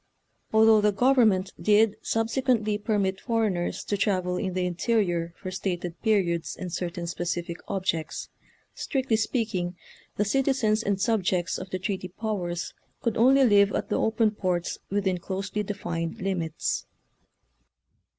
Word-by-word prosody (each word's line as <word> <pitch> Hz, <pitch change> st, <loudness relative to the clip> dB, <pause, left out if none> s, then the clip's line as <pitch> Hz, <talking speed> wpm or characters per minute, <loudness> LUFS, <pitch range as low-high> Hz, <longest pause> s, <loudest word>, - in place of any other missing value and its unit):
Although 220 Hz, 0 st, +6 dB
the 210 Hz, 0 st, +4 dB
government 215 Hz, -5 st, +3 dB
did 215 Hz, 0 st, +4 dB
subsequently 225 Hz, -2 st, 0 dB
permit 200 Hz, -3 st, 0 dB
foreigners 220 Hz, -7 st, -1 dB
to 205 Hz, -, -1 dB
travel 185 Hz, -3 st, 0 dB
in 185 Hz, -1 st, -2 dB
the 185 Hz, -1 st, 0 dB
interior 175 Hz, -3 st, 0 dB
for 185 Hz, -, -6 dB
stated 180 Hz, -2 st, -3 dB
periods 185 Hz, -7 st, +1 dB
and 180 Hz, -2 st, -5 dB
certain 175 Hz, -1 st, -3 dB
specific 175 Hz, 0 st, -3 dB
objects, 175 Hz, -5 st, -2 dB, 0.5 s
strictly 265 Hz, -4 st, -1 dB
speaking' 220 Hz, -6 st, -1 dB, 0.4 s
the 210 Hz, -, +2 dB
citizens 240 Hz, -2 st, +2 dB
and 200 Hz, -3 st, -1 dB
subjects 190 Hz, -5 st, +1 dB
of 185 Hz, -, -7 dB
the 185 Hz, -, -2 dB
treaty 190 Hz, 0 st, -3 dB
powers 180 Hz, -3 st, -3 dB, 0.3 s
could 230 Hz, -3 st, 0 dB
only 265 Hz, +4 st, +5 dB
live 200 Hz, -3 st, +5 dB
at -, -, -2 dB
the -, -, +1 dB
"open 220 Hz, -1 st, +2 dB
ports" 180 Hz, -4 st, -2 dB
within 190 Hz, -2 st, 0 dB
closely 190 Hz, +3 st, -3 dB
defined 175 Hz, -2 st, -4 dB
limits. 180 Hz, -5 st, -2 dB
195 Hz, 130 wpm, -26 LUFS, 180-220 Hz, 0.5 s, Although